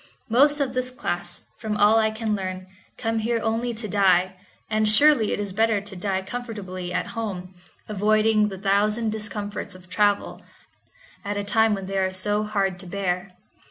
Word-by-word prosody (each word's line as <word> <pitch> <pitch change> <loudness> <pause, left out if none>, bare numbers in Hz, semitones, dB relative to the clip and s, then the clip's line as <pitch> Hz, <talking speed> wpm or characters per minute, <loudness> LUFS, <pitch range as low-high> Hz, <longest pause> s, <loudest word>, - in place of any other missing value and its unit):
Most 290 +5 +5
of 270 -3 0
this 255 0 -1
class, 175 -8 -4 0.2
from 215 -2 -2
all 210 +2 +5
I 220 0 +3
can 220 -1 -2
learn, 185 -1 -5 0.3
come 225 -1 -1
here 230 +1 0
only 225 +2 0
to 220 0 -4
die, 185 -2 +3 0.3
and 215 0 +2
surely 250 -1 +5
it - - -1
is 200 -2 -4
better 220 0 +2
to 200 0 -8
die 190 +1 -2
comfortably 190 -6 -6
at - - -2
home, 190 -5 -5 0.3
avoiding 215 +1 +3
the 195 -2 -6
thousand 210 +3 +1
discomforts 210 -2 -4
of 185 -1 -15
travel, 205 -1 +1 0.8
at 205 0 -3
a 205 - -1
time 220 +1 +3
when 195 -1 -6
they 195 0 -2
are 190 0 +1
so 205 +3 +1
heard 200 -4 -1
to 185 - -9
bear. 180 0 -3
210 Hz, 175 wpm, -24 LUFS, 190-220 Hz, 0.8 s, Most